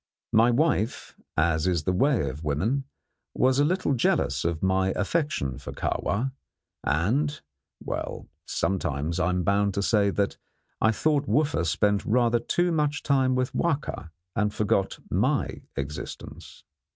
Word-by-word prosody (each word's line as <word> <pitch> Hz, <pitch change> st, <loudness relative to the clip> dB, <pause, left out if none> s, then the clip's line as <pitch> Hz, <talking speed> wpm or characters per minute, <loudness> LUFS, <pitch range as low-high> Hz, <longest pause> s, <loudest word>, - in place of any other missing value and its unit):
My 115 Hz, +2 st, +6 dB
wife, 120 Hz, -3 st, 0 dB, 0.2 s
as 80 Hz, +1 st, +2 dB
is 85 Hz, -4 st, +1 dB
the 90 Hz, -, 0 dB
way 125 Hz, -, +2 dB
of 70 Hz, +4 st, -6 dB
women, 105 Hz, -, 0 dB, 0.5 s
was 130 Hz, +1 st, +3 dB
a -, -, +5 dB
little 175 Hz, -1 st, +1 dB
jealous 70 Hz, -, +1 dB
of 85 Hz, 0 st, -2 dB
my 95 Hz, 0 st, +2 dB
affection 105 Hz, -, -1 dB
for -, -, -8 dB
Kahwa, 120 Hz, +7 st, -1 dB, 0.5 s
and 130 Hz, -, +1 dB, 0.4 s
well, -, -, -4 dB, 0.2 s
sometimes 85 Hz, -3 st, -1 dB
I 90 Hz, -1 st, +2 dB
am 90 Hz, 0 st, 0 dB
bound 100 Hz, +2 st, +2 dB
to 100 Hz, -, 0 dB
say 100 Hz, -2 st, +3 dB
that 100 Hz, 0 st, -1 dB, 0.4 s
I 110 Hz, -, +5 dB
thought 145 Hz, +4 st, +1 dB
Wooffa 145 Hz, -, +2 dB
spent 100 Hz, +5 st, +2 dB
rather 120 Hz, +1 st, +2 dB
too 175 Hz, +9 st, 0 dB
much 150 Hz, -2 st, 0 dB
time 130 Hz, -2 st, +2 dB
with 130 Hz, 0 st, -1 dB
Wahka 145 Hz, -, -1 dB, 0.3 s
and 105 Hz, -2 st, +1 dB
forgot 100 Hz, -2 st, 0 dB
my -, -, 0 dB
existence. 70 Hz, +2 st, -7 dB
105 Hz, 140 wpm, -26 LUFS, 85-135 Hz, 0.5 s, My